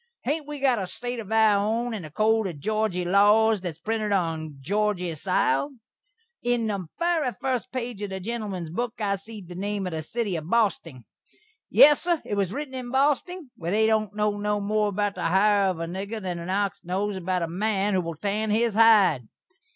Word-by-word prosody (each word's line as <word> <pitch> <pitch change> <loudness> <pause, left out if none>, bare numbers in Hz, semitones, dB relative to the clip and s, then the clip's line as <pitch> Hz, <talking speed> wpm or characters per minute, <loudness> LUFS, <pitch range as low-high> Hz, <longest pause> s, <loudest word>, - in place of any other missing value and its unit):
Hain't 295 +3 -2
we 295 0 -5
got 260 -4 +2
a 190 - -3
State 245 +5 -5
of 215 -2 -8
our 215 -2 +4
own 230 +3 -1
and 210 -5 -5
a 155 - -8
code 215 +5 +2
of 170 -5 -6
Georgy 215 +1 -1
laws 205 +3 +4
that's 175 -4 -5
printed 215 +2 -2
on 160 -6 -1
Georgy 185 +2 -1
sile? 185 - 0 0.7
On 240 -1 +1
the 200 -5 -3
very 335 -6 +1
fust 255 -2 -2
page 240 -4 -4
of 205 - -3
the 190 0 -5
gentleman's 195 -5 -4
book 235 +5 -3
I 200 -2 0
seed 205 -1 -11
the 175 - -9
name 200 +2 -3
of 180 - -3
the 160 -1 -3
sitty 205 +3 -3
of 155 +1 -7
Bosting. 175 - 0 0.6
Yes, 295 0 +7
sur, 345 -2 +1
it - - -4
was 200 -3 0
ritten 280 +3 -5
in 255 -2 -5
Bosting, 285 +4 0
where 170 -1 -5
they 215 +4 +3
don't 215 -2 +1
know 210 -1 0
no 210 0 0
more 210 +1 +1
about 205 0 -1
the - - -4
hire 200 +2 +3
of 180 -3 -3
a 165 - -2
nigger 195 +6 -5
than 180 -4 -4
an 170 +2 -7
ox 200 0 -1
knows 195 +4 -2
the 180 -1 0
man 200 +3 0
who 185 - +2
will 165 -1 -5
tan 210 +5 -2
his 225 +1 +2
hide." 205 - +5
205 Hz, 205 wpm, -25 LUFS, 185-225 Hz, 0.7 s, Yes